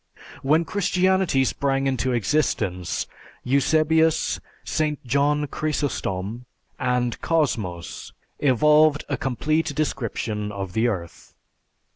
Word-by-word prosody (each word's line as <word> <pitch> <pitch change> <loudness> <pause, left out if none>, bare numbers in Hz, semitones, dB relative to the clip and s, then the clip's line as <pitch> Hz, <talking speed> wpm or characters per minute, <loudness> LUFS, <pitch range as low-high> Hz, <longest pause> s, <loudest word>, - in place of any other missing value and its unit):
When 155 +4 +3
Christianity 185 -7 +2
sprang 135 0 0
into 130 -1 0
existence 105 - 0 0.4
Eusebius, 155 +4 +2 0.2
St. 150 -3 -1
John 145 +4 +2
Chrysostom, 125 -8 -3 0.3
and 125 -2 0
Cosmos 110 - -1 0.3
evolved 150 +3 +4
a 140 - +1
complete 145 +4 -1
description 115 -7 -2
of 95 -3 -5
the 110 +4 +2
earth. 90 -7 -5
135 Hz, 90 wpm, -24 LUFS, 115-155 Hz, 0.4 s, evolved